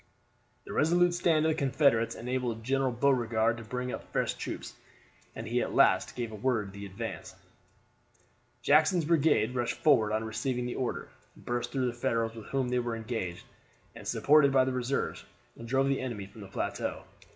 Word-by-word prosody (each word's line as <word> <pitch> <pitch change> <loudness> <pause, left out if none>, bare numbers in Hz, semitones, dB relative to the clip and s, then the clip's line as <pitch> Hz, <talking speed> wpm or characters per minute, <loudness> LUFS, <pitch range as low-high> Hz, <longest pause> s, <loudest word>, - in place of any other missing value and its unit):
The - - -7
resolute 175 +3 +3
stand 165 -3 +2
of - - +3
the - - 0
Confederates 135 -4 +2
enabled 120 -2 -3
General 135 +1 +1
Beauregard 120 -3 +2
to 115 - -8
bring 125 +3 -4
up - - -8
fresh - - 0
troops, - - -6 0.6
and 115 - -6
he 120 +2 +1
at - - -3
last - - +4
gave 120 -2 -3
the - - -7
word 110 -3 -1
to 100 0 -8
advance. 110 +4 -6 1.3
Jackson's 155 +4 +4
brigade 150 -8 +3
rushed 120 -2 -1
forward 120 -9 +4
on 110 +1 0
receiving 120 +3 -2
the 125 - -3
order, 125 - -3 0.3
burst 120 0 -3
through 130 -1 0
the 120 - -1
Federals 115 -1 -1
with 115 -2 -10
whom 135 -2 -1
they 125 0 +1
were 120 -1 -2
engaged, 110 -6 -4 0.5
and, - - -10
supported 145 -1 +4
by 130 -1 +4
the 130 - -1
reserves, 125 +2 -2 0.4
drove 135 +3 +1
the 135 -1 0
enemy 115 -6 -4
from 100 +2 -13
the 100 - -9
plateau. 95 - -3
125 Hz, 175 wpm, -30 LUFS, 115-135 Hz, 1.3 s, last